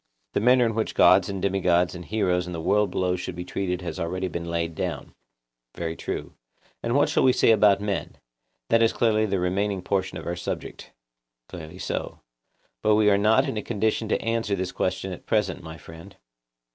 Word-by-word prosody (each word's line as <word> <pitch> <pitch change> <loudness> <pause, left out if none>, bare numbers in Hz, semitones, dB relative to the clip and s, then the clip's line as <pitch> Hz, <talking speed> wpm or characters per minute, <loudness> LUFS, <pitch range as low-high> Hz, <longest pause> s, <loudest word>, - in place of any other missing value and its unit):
The - - +1
manner 125 +3 +4
in 115 - 0
which 110 0 -2
gods - - +5
and 100 -1 -3
demigods 90 -3 +1
and 90 - -7
heroes 90 -3 0
and 90 - -5
the - - -4
world 105 +4 +2
below 90 0 0
should 90 0 -5
be 90 0 -6
treated 90 -1 -3
has 90 - -5
been - - -2
already 90 +2 -3
laid 85 0 -3
down. - - -4 0.6
Very 85 -1 -3
true. - - -5 0.5
And 115 +2 -1
what 145 - +4
shall - - +1
we 130 - +5
say 120 - +4
about 105 -2 +5
men? 105 -1 -3 0.5
That 115 0 +4
is 115 - +3
clearly 110 -2 +2
the 100 -1 0
remaining 95 +1 -1
portion 95 -1 -1
of - - -8
our 85 - -2
subject. 90 - -6 0.6
Clearly 85 0 -9
so. - - -4 0.6
But 105 0 +4
we 105 -1 +4
are 100 - +4
not 110 +2 +3
in - - -3
a - - -1
condition 110 0 -1
to - - +1
answer 115 -3 0
this 95 -1 -3
question 95 +1 -2
at 90 - -9
present, 105 -3 0
my 80 -1 -9
friend. 80 +5 -13
95 Hz, 200 wpm, -25 LUFS, 90-110 Hz, 0.6 s, gods